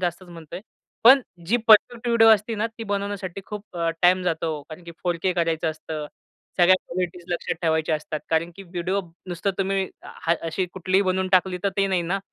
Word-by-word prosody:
जास्तच 175 0 -3
म्हणत 165 -3 -12
आहे.पण 230 +7 +3 0.3
जी 230 +7 +3
perfect 230 +2 +5
video 230 -1 +6
असते 220 +1 +4
ना, 215 +1 0
ती 225 0 -9
बनवण्यासाठी 200 -2 -3
खूप 210 -1 -7
अ, 170 -1 0
टाईम 180 +1 +5
जातो 160 -3 -1
कारण 155 +3 -9
की 170 - -9
4K 175 +1 0
करायचं 165 -2 0
असतं. 155 -1 -6 0.5
सगळ्या 180 +1 +7
क्वालिटीज 180 0 -4
लक्षात 175 0 -2
ठेवायच्या 160 -1 +1
असतात, 150 0 -6
कारण 165 +1 +1
की 195 - -9
व्हिडिओ 185 +2 -2 0.3
नुसतं 180 +2 -2
तुम्ही 195 -1 0 0.2
हा 170 - -1
अशी 165 +3 -2
कुठलीही 190 +1 +1
बनवून 185 0 0
टाकली 185 0 +3
तर 200 - +4
ते 195 -1 +3
नाही 185 -2 +1
ना, 180 +4 -1
185 Hz, 185 wpm, -24 LUFS, 170-200 Hz, 0.5 s, सगळ्या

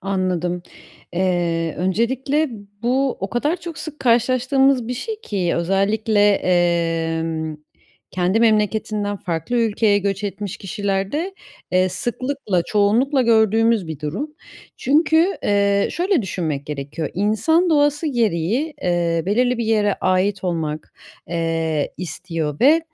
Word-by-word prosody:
Anladım, 180 -2 -1 0.5
eee. 170 -3 0
Öncelikle 260 - 0 0.3
bu 260 +3 +2
o 195 - -3
kadar 295 +9 0
çok 335 -4 -7
sık 305 -1 -7
karşılaştığımız 255 +1 +2
bir 250 - -2
şey 440 - -5
ki 185 -4 -1
özellikle, 205 +4 +2
emm, 165 -3 0 0.5
kendi 185 +4 +1
memleketinden 210 -2 +1
farklı 170 +6 -3
ülkeye 215 -2 +2
göç 200 +1 -2
etmiş 205 -1 -4
kişilerde, 200 - -2 0.4
eee, 185 0 +3
sıklıkla, 240 -4 -2
çoğunlukla 235 +7 +2
gördüğümüz 225 -3 +3
bir 160 -3 -6
durum. 190 - -4 0.5
Çünkü, 320 +6 +3
eee, 200 0 +2
şöyle 355 - +1
düşünmek 160 -6 -3
gerekiyor; 145 +1 -4
insan 220 - +2
doğası 295 +1 +2
gereği, 235 - 0
eee, 170 -2 +1
belirli 245 +4 +2
bir 235 - -1
yere 210 -2 +2
ait 185 +1 +1
olmak, 160 -3 -3 0.3
eee, 165 -3 -1
istiyor 165 -3 -4
ve, 310 +5 +6
205 Hz, 115 wpm, -21 LUFS, 175-250 Hz, 0.5 s, ve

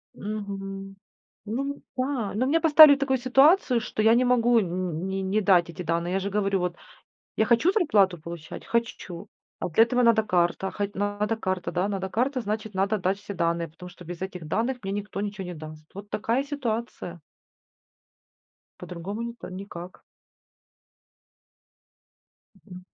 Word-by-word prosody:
Мгм. 195 -2 -6 0.5
Ну 275 +6 -3 0.2
да, 255 -5 -1
но 250 +4 +1
мне 320 +5 +3
поставили 310 -2 +9
такую 270 -1 0
ситуацию, 270 +2 +4
что 215 - -3
я 225 +1 +6
не 250 +1 +3
могу 240 -1 +4
нь 180 -2 -2
ни 190 - -3
не 195 +3 0
дать 180 -4 +4
эти 175 +2 -7
данные. 170 +1 -1
Я 195 - +1
же 200 - -3
говорю, 200 -1 0
вот 180 -1 -2 0.6
я 220 - +2
хочу 235 - +4
зарплату 205 - +3
получать? 165 -1 -9
Хочу. 230 -7 -3 0.3
А - - -2
для 220 +8 +6
этого 245 +2 +1
надо 230 -2 +5
карта, 180 0 +1
хоть 205 0 -4
надо 205 +2 -1
карта, 185 -4 -3
да, 180 +1 +1
х 205 - 0
надо 190 -1 -2
карта, 255 +6 0
значит 215 0 -4
надо 195 +3 +1
дать 190 +1 0
все 200 0 -7
данные. 170 -1 0
Потому 180 +3 -12
что 180 -1 -14
без 175 +1 -8
этих 180 -4 -6
данных 240 +9 0
мне 195 - -3
никто 205 -1 -4
ничего 205 -1 -4
не 180 - -6
даст. 155 -1 -10
Вот 200 +1 -9
такая 230 +6 0
ситуация. 235 - -4 1.6
По-другому 185 +5 -6
нит 235 0 -5
никак. 185 -1 -9 2.6
Мгм. 180 -3 -11
200 Hz, 160 wpm, -26 LUFS, 180-235 Hz, 2.6 s, поставили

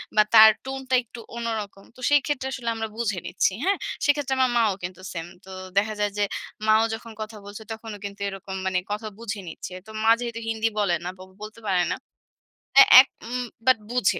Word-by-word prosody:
বা 215 - +7
তার 220 -1 +10 0.2
টোনটা 265 -1 -2
একটু 235 +1 -12 0.2
অন্যরকম। 220 -4 -4
তো - - -18
সেই 290 -1 +5
ক্ষেত্রে 270 -3 -2
আসলে 235 -3 -3
আমরা 225 0 -3
বুঝে 220 -6 -1
নিচ্ছি, 185 - +1
হ্যাঁ? 390 +2 +2 0.3
সেক্ষেত্রে 290 -2 +2
আমার 260 -1 +3
মাও 220 -4 +3
কিন্তু 180 +1 -6
সেম। 165 -1 -5 0.2
তো 190 - -11 0.3
দেখা 215 +2 +2
যায় 205 0 +1
যে 205 - +2 0.4
মাও 215 +1 +5
যখন 225 +1 -7
কথা 215 0 -6
বলছে 205 +2 -9
তখনও 220 -1 -8
কিন্তু 200 0 -7
এরকম 195 0 -6
মানে 190 -1 +1
কথা 210 +1 -3
বুঝে 220 -2 -5
নিচ্ছে। 165 +2 -8
তো 220 - -12
মা 225 - +5
যেহেতু 235 -1 -4
হিন্দি 225 0 0
বলে 195 -4 +2
না - - -2 0.3
বলতে 215 +2 -9
পারে 180 -2 +2
না - - 0 0.8
হ্যাঁ, 275 - +10
এক 265 - -3 0.2
উম 250 +1 -2 0.3
বাট 260 - +6
বুঝে। 195 -7 +2
220 Hz, 200 wpm, -25 LUFS, 200-240 Hz, 0.8 s, তার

